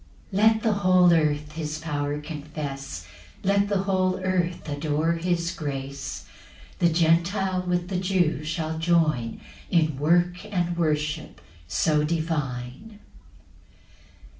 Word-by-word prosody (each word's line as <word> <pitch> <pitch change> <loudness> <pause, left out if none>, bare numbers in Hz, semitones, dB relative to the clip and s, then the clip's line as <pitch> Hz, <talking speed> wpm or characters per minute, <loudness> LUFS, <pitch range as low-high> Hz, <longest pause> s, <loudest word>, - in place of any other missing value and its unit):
8 - - -3
Let 220 +2 +4
the 220 -2 +3
whole 185 -3 +5
earth 150 -2 +1
his 155 -1 -4
power 145 -2 -2
confess, 145 - -6 0.4
Let 200 +1 +3
the 195 -2 +1
whole 185 -1 +1
earth 180 -2 -1
adore 150 +2 0
his 170 0 0
grace; 140 -4 -5 0.5
The 170 - +4
Gentile 175 +3 +2
with 180 0 -1
the 185 -2 -1
Jew 180 -6 +1
shall 160 0 -3
join 160 -8 +1 0.3
In 155 -5 +2
work 175 +4 +2
and 175 -4 -1
worship 150 -2 -1 0.3
so 150 - +2
divine. 150 - -3
165 Hz, 115 wpm, -25 LUFS, 150-180 Hz, 0.5 s, whole